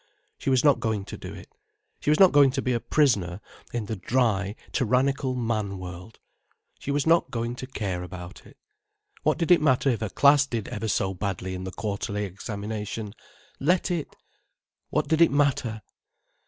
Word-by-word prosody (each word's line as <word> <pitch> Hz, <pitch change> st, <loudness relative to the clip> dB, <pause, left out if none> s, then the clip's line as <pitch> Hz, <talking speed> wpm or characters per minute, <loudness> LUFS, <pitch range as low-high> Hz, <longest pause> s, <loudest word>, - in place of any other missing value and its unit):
She -, -, -2 dB
was 130 Hz, -2 st, +3 dB
not 145 Hz, -3 st, +5 dB
going 110 Hz, -3 st, -1 dB
to -, -, -7 dB
do -, -, -8 dB
it. -, -, -11 dB, 0.5 s
She -, -, -2 dB
was 155 Hz, -, +4 dB
not 190 Hz, -2 st, +8 dB
going 145 Hz, -2 st, +6 dB
to 135 Hz, -, -1 dB
be 125 Hz, -, +1 dB
a 120 Hz, -, +1 dB
prisoner 105 Hz, -, +1 dB, 0.3 s
in 120 Hz, -3 st, -3 dB
the 110 Hz, -, -3 dB
dry, 105 Hz, -1 st, 0 dB, 0.2 s
tyrannical 130 Hz, +2 st, +1 dB
man 110 Hz, -5 st, -1 dB
world. 90 Hz, +3 st, -9 dB, 0.6 s
She -, -, -7 dB
was 140 Hz, 0 st, +1 dB
not 165 Hz, +1 st, +4 dB
going 120 Hz, 0 st, -2 dB
to 130 Hz, -, -6 dB
care 100 Hz, -8 st, -3 dB
about 90 Hz, 0 st, -9 dB
it. -, -, -18 dB, 0.6 s
What -, -, +1 dB
did 165 Hz, +1 st, 0 dB
it 175 Hz, -, +7 dB
matter 135 Hz, -2 st, +3 dB
if 115 Hz, -, -1 dB
her 110 Hz, -, -2 dB
class 140 Hz, +3 st, +5 dB
did 115 Hz, -5 st, -3 dB
ever 110 Hz, +2 st, -4 dB
so 95 Hz, -2 st, 0 dB
badly 95 Hz, -1 st, -3 dB
in 95 Hz, 0 st, -5 dB
the 95 Hz, -, -5 dB
quarterly 105 Hz, 0 st, -3 dB
examination. 105 Hz, +2 st, -5 dB, 0.5 s
Let 175 Hz, +5 st, +2 dB
it—what 165 Hz, -3 st, -6 dB
did 160 Hz, +2 st, +2 dB
it 170 Hz, -, +7 dB
matter? 130 Hz, -6 st, +1 dB
115 Hz, 180 wpm, -26 LUFS, 100-140 Hz, 0.6 s, not